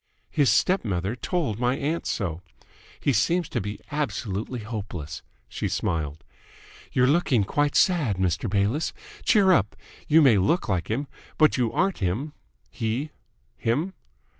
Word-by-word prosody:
His 145 -3 +3
step 190 +1 +3
mother 95 +1 -2
told 130 - -2
my 125 +2 +1
aunt 155 +4 -2
so. 85 -5 -2 0.6
He 140 - +1
seems 170 - +2
to - - -1
be 105 +2 -5
absolutely 125 -5 -3
hopeless." 100 -8 -6 0.3
She - - -3
smiled. 75 -2 -2 0.7
"You're 125 - +3
looking 135 -6 +3
quite 145 +8 0
sad, 155 - +3
Mr. 95 +3 0
Bayliss. 105 +10 0 0.3
Cheer 200 -5 +5
up! 105 - +2 0.3
You 155 +1 +6
may 115 -8 +6
look 165 - +1
like 95 -4 -1
him, 130 +7 -1 0.3
but 155 -1 +5
you 120 -3 +1
aren't 195 0 0
him 110 - -2 0.4
he? 120 +6 -2 0.5
him? 150 +12 0
120 Hz, 140 wpm, -25 LUFS, 100-150 Hz, 0.7 s, You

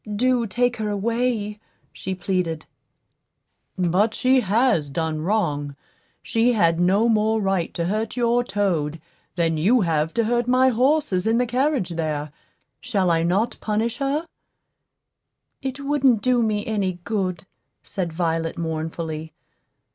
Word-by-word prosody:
Do 245 +1 +2
take 245 +4 0
her 215 -1 -2
away," 215 0 -1 0.3
she 190 0 -4
pleaded. 180 -4 -2 1.1
"But 185 +5 +2
she 260 +1 +3
has 210 - +2
done 155 +1 -2
wrong; 150 -7 -1 0.5
she 230 +2 +2
had 170 -6 +2
no 195 +6 +3
more 220 0 +2
right 195 -4 0
to 170 - -1
hurt 215 +6 -2
your 240 0 +2
toad 170 -9 -1 0.4
than 165 -2 +1
you 220 +10 +3
have 160 -3 0
to 230 - +2
hurt 240 +1 0
my 255 +1 +4
horses 250 -6 +1
in 225 +1 +3
the 250 - +2
carriage 255 - 0
there. 155 -3 -3 0.5
Shall 195 -8 0
I 165 -1 +2
not 190 +7 0
punish 220 +2 -1
her?" 285 +3 -1 1.4
"It 265 0 -4
wouldn't 275 -5 +2
do 250 -1 +3
me 215 -2 0
any 200 -4 -1
good," 185 -6 -2 0.4
said 180 -4 -3
Violet, 165 -1 -1
mournfully. 160 -1 -4
205 Hz, 135 wpm, -23 LUFS, 170-240 Hz, 1.4 s, my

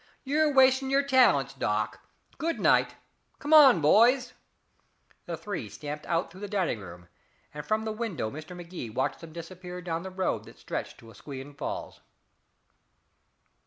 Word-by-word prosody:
You're 300 +2 +2
wasting 265 0 +4
your 275 +1 +3
talents, 260 -2 +4
Doc. - - -2 0.4
Good 330 +1 -1
night! - - +3 0.4
Come 295 +1 -1
on, 270 - +8
boys." 245 - +4 0.9
The 170 -1 -4
three 165 - -5
stamped 150 +4 -7
out 165 0 -1
through 185 +3 -13
the 205 - -4
dining 190 - -1
room, 90 -2 -11 0.5
and 150 0 -6
from 215 +7 -1
the 220 - -2
window 215 - -3
Mr. 155 +4 -9
Magee 170 -8 -7
watched 130 +5 -2
them 165 -1 -10
disappear 180 +2 -8
down 170 -2 -3
the 190 - -6
road 185 0 -2
that - - -15
stretched - - -5
to 115 -1 -14
Asquewan 135 +5 -9
Falls. - - -6
180 Hz, 155 wpm, -28 LUFS, 150-250 Hz, 0.9 s, on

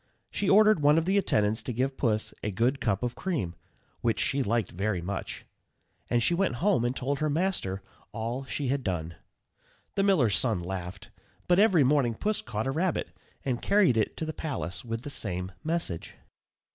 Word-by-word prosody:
She 200 - -1
ordered 215 -2 +6
one 145 +2 +5
of 165 - +2
the 195 +2 +3
attendants 110 - +1
to 125 - -4
give 130 +3 -1
Puss 110 -5 0
a 105 - -2
good 120 +7 0
cup 95 +4 0
of 120 -1 -1
cream, 140 - -2 0.5
which 115 -2 0
she 140 +1 +1
liked 115 -3 0
very 100 +1 -1
much; 95 +3 -5 0.6
and 120 -1 +2
she 175 - +3
went 175 -7 +1
home 175 - +2
and 120 +2 0
told 140 +2 -2
her 155 0 +1
master 145 - -1 0.3
all 115 +4 -3
she 135 0 -3
had 135 0 0
done. 85 -5 -2 0.8
The 200 - +1
miller's 150 - +3
son 115 -7 +1
laughed; 90 +1 -6 0.4
but 180 +1 +4
every 195 -8 +5
morning 130 -4 +2
Puss 215 - -1
caught 110 - -3
a 135 - 0
rabbit, 170 +4 -1 0.4
and 125 -3 -1
carried 200 - +4
it 110 -2 0
to 160 - -2
the 155 - -4
palace 115 - -4
with 115 0 -4
the 145 - -6
same 90 -6 -2
message. 160 - -2
125 Hz, 185 wpm, -28 LUFS, 105-160 Hz, 0.8 s, ordered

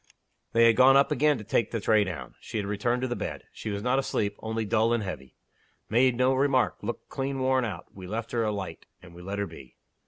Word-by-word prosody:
They 115 0 +6
had 115 -1 +5
gone 135 +1 +7
up 140 - +3
again 150 +1 +3
to - - -8
take 110 +2 +1
the 115 - -2
tray 110 0 +3
down. 85 -10 -6
She - - -6
had 105 - -1
returned 120 +5 -1
to - - +1
the 120 - -2
bed. - - -5
She - - -6
was 100 0 -3
not 125 +2 +2
asleep 105 -6 -1
only 110 0 -3
dull 110 +2 +2
and 115 -2 0
heavy. 65 -9 -7 0.6
Made 125 +2 +4
no 130 +2 +3
remark. 130 -1 +2
Looked 115 +3 -5
clean 135 0 -3
worn 130 -1 +2
out. 90 -7 -5
We 95 -2 -9
left 115 +3 -4
her 115 -1 0
a 110 - 0
light; 100 -3 -6 0.2
and 90 -1 -13
we 85 - -12
let 100 +3 -5
her 100 - 0
be. 80 -8 -13
115 Hz, 245 wpm, -27 LUFS, 100-130 Hz, 0.6 s, gone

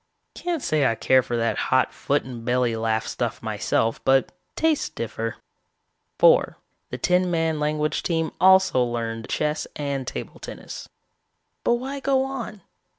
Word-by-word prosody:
Can't 340 -5 -3
say 150 -3 +2
I 115 - +1
care 130 +3 +4
for 120 -1 -3
that 115 0 0
hot 130 0 +3
foot 145 +1 0
and 120 -3 -8
belly 120 -1 +1
laugh 110 0 0
stuff - - -3
myself, 115 0 0
but 135 0 +3 0.2
tastes 320 -2 +1
differ. - - -4 0.8
"Four, - - +5 0.3
the - - -5
ten 180 0 +2
man 165 -2 0
language 150 0 0
team 165 -2 -1
also 190 -8 +6
learned 115 -1 -3
chess 150 0 -1
and 140 -3 -3
table - - -6
tennis. - - -8 0.7
"But 240 - +3
why 265 +3 -4
go 270 -1 +2
on? 250 -6 -5
150 Hz, 150 wpm, -24 LUFS, 125-190 Hz, 0.8 s, also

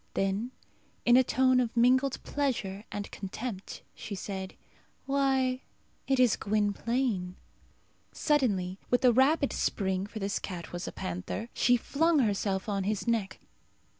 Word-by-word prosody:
Then, 195 +5 0 0.6
in 240 - +6
a 260 - +7
tone 255 +1 +3
of 240 -1 -1
mingled 260 +3 +3
pleasure 225 -8 -2
and 205 0 -5
contempt, 200 +1 -6
she 205 - -6
said, 190 0 -5 0.5
"Why, 265 -2 +1 0.5
it 270 -1 +2
is 250 -3 +5
Gwynplaine!" 210 -1 0 0.8
Suddenly 200 - +1
with 245 +1 +2
a 245 - +6
rapid 280 +4 +3
spring, 190 -1 -1
for 220 - -9
this 200 -1 -1
cat 175 -3 -6
was 175 +1 -4
a - - -4
panther, 90 - -5
she 245 0 +4
flung 320 +7 +2
herself 200 -5 0
on 200 -2 -1
his 210 +2 -2
neck. 215 -5 -1
225 Hz, 135 wpm, -29 LUFS, 195-255 Hz, 0.8 s, a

